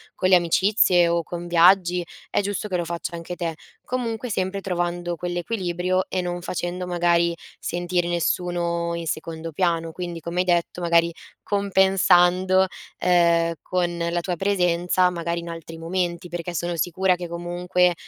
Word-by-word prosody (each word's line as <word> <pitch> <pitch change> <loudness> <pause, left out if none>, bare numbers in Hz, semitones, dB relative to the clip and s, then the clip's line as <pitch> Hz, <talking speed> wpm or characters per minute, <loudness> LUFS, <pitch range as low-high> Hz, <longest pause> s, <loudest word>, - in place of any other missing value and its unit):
con 185 - +1
le 185 - +8
amicizie 180 +1 +3
o 170 0 +1
con 175 +1 -6
viaggi, 175 +1 +4 0.2
è - - +1
giusto 205 +1 -3
che 185 -3 -1
lo 175 - -2
faccia 170 +1 -4
anche 170 +1 -6
te. 165 -2 -3 0.3
Comunque 240 -1 -3
sempre 195 -1 -2
trovando 175 -2 -2
quell'equilibrio 180 +1 -2
e 185 - -1
non 175 0 -3
facendo 180 +1 -4
magari 170 -1 +2 0.2
sentire 175 0 -1
nessuno 170 0 -1
in 170 0 -5
secondo 160 +1 -4
piano. 165 0 0
Quindi, 175 0 -5
come 170 +2 -4
hai 180 - +2
detto, 175 0 0
magari 170 0 +3 0.3
compensando, 190 -2 +4 0.3
ehm, 170 -2 +3
con 175 -1 -1
la 170 0 -1
tua 180 0 -2
presenza 180 -1 +2
magari 170 0 -3
in 170 - -8
altri 165 -1 -8
momenti, 175 +1 -2
perché 175 0 -5
sono 175 +2 -2
sicura 180 +3 +1
che 175 -1 -6
comunque, 175 +1 0
175 Hz, 155 wpm, -23 LUFS, 170-185 Hz, 0.3 s, le